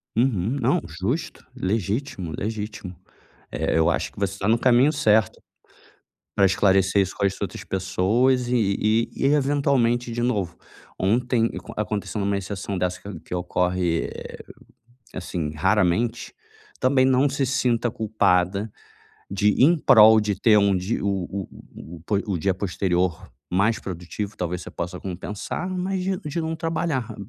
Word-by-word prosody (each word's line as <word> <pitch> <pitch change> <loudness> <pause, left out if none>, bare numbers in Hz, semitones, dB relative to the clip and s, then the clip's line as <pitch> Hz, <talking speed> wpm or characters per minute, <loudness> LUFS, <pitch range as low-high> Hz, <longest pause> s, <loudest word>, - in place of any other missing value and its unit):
Uhum, 115 0 +1
não, 125 +2 +2
justo, 105 - -4
legítimo, 105 - -2
legítimo. 105 -3 -5 0.6
É, - - 0
eu 80 +1 +3
acho - - -1
que - - -13
você 100 -1 -1
está 100 0 -3
no 115 +2 +4
caminho 125 +4 +4
certo, 110 -8 +2 1.0
para 100 - +4
esclarecer 95 +1 +3
isso 95 -1 -1
com - - -1
as 95 -1 0
outras - - -4
pessoas, 110 +7 +1
e 125 - +1
e 110 +2 +1 0.2
e - - +5
eventualmente 135 -4 +2
de 120 +1 -3
novo, 100 -9 -1 0.4
ontem 115 +4 +1 0.3
a - - -2
aconteceu 105 +1 -4
uma 100 0 0
exceção 100 0 -4
dessa, 90 0 -2
que 100 -5 -8
que - - -8
ocorre, 90 -1 0 1.0
assim, 85 -4 -4
raramente, 105 +6 +1 0.5
também 130 0 +4
não 130 +2 +3
se 135 0 -1
sinta 125 -3 +1
culpada 100 -2 +1 0.6
de 100 +2 +2
em 165 +6 +6
prol 110 -6 +7
de 105 -3 -2
ter 110 -1 +5
um 100 -1 +3
di 95 +5 -2
o - - -3
o 95 -1 -2 0.3
o 85 - -10
o - - -15
po 105 - 0
o 100 -4 -1
dia 95 +4 +1
posterior 90 -2 -1 0.2
mais 100 +5 +2
produtivo, 95 +3 -6
talvez, 90 0 -3
você - - -9
possa 90 +1 -5
compensar. 100 - -5
Mas 185 +1 -2
de 190 0 -1
de 150 0 -4
não 160 0 -2
trabalhar 160 -6 -2
105 Hz, 150 wpm, -24 LUFS, 95-125 Hz, 1.0 s, prol